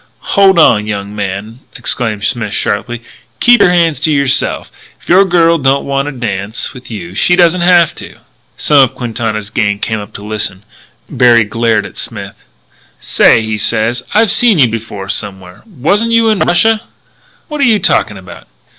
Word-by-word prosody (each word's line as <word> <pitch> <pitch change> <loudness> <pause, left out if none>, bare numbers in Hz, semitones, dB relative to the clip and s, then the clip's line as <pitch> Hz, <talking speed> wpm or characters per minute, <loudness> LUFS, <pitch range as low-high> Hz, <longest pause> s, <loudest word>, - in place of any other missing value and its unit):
"Hold 195 -2 +4
on, 105 -10 +3
young 100 -1 -5
man!" 100 +3 -5 0.2
exclaimed 110 -5 -1
Smith 110 -1 -2
sharply. 120 +3 -3 0.4
"Keep 245 0 +4
your 180 - +4
hands 170 -3 +1
to 160 - 0
yourself. 140 -3 0 0.3
If - - -22
your 190 +3 +4
girl 170 -2 +2
don't 135 0 0
want 140 0 -2
to - - -3
dance 110 -2 -4
with 125 -1 -11
you 90 -6 -8
she 180 - +2
doesn't 175 0 +3
have 175 -2 +3
to." - - -9 0.4
Some 145 - +3
of 130 0 -2
Quintana's 110 -4 -4
gang 105 -3 -1
came 110 +1 -3
up 105 -1 -10
to 105 - -10
listen. 105 -2 -4 0.4
Berry 120 -2 +3
glared 110 -1 -1
at 100 - -12
Smith. - - -6 0.6
"Say," 110 - +2
he 110 -1 -3
said, 115 +3 0
"I 220 +2 +5
seen 225 -1 +3
you 130 -6 +4
before 110 -3 -6
somewhere. 95 -2 -5
Wasn't 200 - -1
you 230 -1 +2
in 215 -3 0
Russia?" 220 +5 +2 0.7
"What 300 -2 -5
are - - +4
you 225 -4 +3
talking 110 - 0
about?" 95 -1 -13
120 Hz, 175 wpm, -12 LUFS, 105-170 Hz, 0.7 s, I